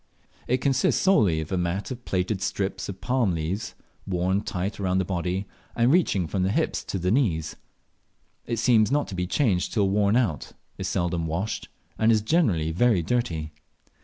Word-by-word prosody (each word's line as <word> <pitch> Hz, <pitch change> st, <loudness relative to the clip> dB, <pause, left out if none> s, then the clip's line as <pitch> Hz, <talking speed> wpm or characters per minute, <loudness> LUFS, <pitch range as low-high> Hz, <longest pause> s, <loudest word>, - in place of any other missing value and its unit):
It 125 Hz, +1 st, +1 dB
consists 135 Hz, 0 st, +2 dB
solely 100 Hz, -, +3 dB
of 80 Hz, -, -7 dB
a 95 Hz, -, 0 dB
mat 90 Hz, +7 st, -2 dB
of 125 Hz, -1 st, -7 dB
plaited 95 Hz, +1 st, -1 dB
strips 100 Hz, 0 st, -2 dB
of 95 Hz, -1 st, -7 dB
palm 125 Hz, -8 st, +1 dB
leaves, 80 Hz, +6 st, -3 dB, 0.3 s
worn 95 Hz, +1 st, 0 dB
tight 100 Hz, 0 st, -4 dB
round 95 Hz, -1 st, +1 dB
the 95 Hz, -, 0 dB
body, 90 Hz, +2 st, -2 dB, 0.3 s
and 120 Hz, +2 st, +3 dB
reaching 150 Hz, -, +2 dB
from 95 Hz, +4 st, -2 dB
the 95 Hz, -, +1 dB
hips -, -, 0 dB
to -, -, -3 dB
the 90 Hz, +1 st, 0 dB
knees. 100 Hz, -, +1 dB, 0.9 s
It 115 Hz, -, -1 dB
seems 110 Hz, -2 st, +4 dB
not 145 Hz, +1 st, +1 dB
to 95 Hz, -, -6 dB
be 90 Hz, 0 st, -2 dB
changed 100 Hz, -7 st, +1 dB
till 100 Hz, -4 st, +2 dB
worn 100 Hz, +1 st, +2 dB
out, 110 Hz, -12 st, 0 dB, 0.3 s
is -, -, -2 dB
seldom 85 Hz, -1 st, -1 dB
washed, 90 Hz, +7 st, -3 dB, 0.3 s
and 110 Hz, +1 st, +4 dB
is 110 Hz, -2 st, +2 dB
generally 105 Hz, -, +2 dB
very 100 Hz, 0 st, +2 dB
dirty. 80 Hz, -8 st, -1 dB
95 Hz, 180 wpm, -25 LUFS, 90-115 Hz, 0.9 s, seems